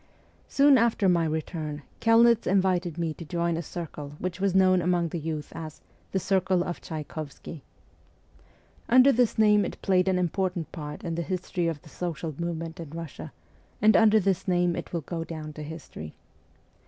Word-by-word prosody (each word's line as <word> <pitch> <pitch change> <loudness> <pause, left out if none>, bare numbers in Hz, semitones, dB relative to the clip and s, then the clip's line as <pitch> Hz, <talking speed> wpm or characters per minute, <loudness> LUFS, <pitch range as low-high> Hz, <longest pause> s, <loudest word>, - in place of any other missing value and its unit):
Soon 280 -2 +5
after 225 -4 +2
my 170 -2 +3
return 155 -1 -4 0.2
Kelnitz 230 0 +5
invited 185 -3 +1
me 165 -2 -1
to 170 - -9
join 170 +1 -1
a 165 - -2
circle 150 -3 -7
which 180 +1 -4
was 195 -1 +1
known 185 -1 +5
among 175 -1 +1
the 170 - -4
youth 155 -1 -5
as 155 -2 -8 0.2
' - - -35
the - - 0
Circle 190 -1 +1
of 175 - -5
Tchaykovsky.' 155 -1 -7 1.3
Under 255 +3 +7
this 245 -2 +2
name 210 -1 +5
it - - -5
played 185 -1 +3
an 190 -1 +2
important 180 -2 -1
part 150 -3 -7
in 170 - -3
the 170 - -2
history 180 -1 -2
of 160 -3 -3
the - - -14
social 165 -1 -4
movement 165 -1 -4
in 165 - -6
Eussia, 165 -1 -7 0.5
and 215 +1 +5
under 220 -1 +6
this 195 -2 0
name 175 -1 +2
it - - -6
will 170 - -2
go 165 +3 -4
down 155 -2 -7
to 155 - -8
history. 150 - -8
175 Hz, 180 wpm, -27 LUFS, 160-190 Hz, 1.3 s, Under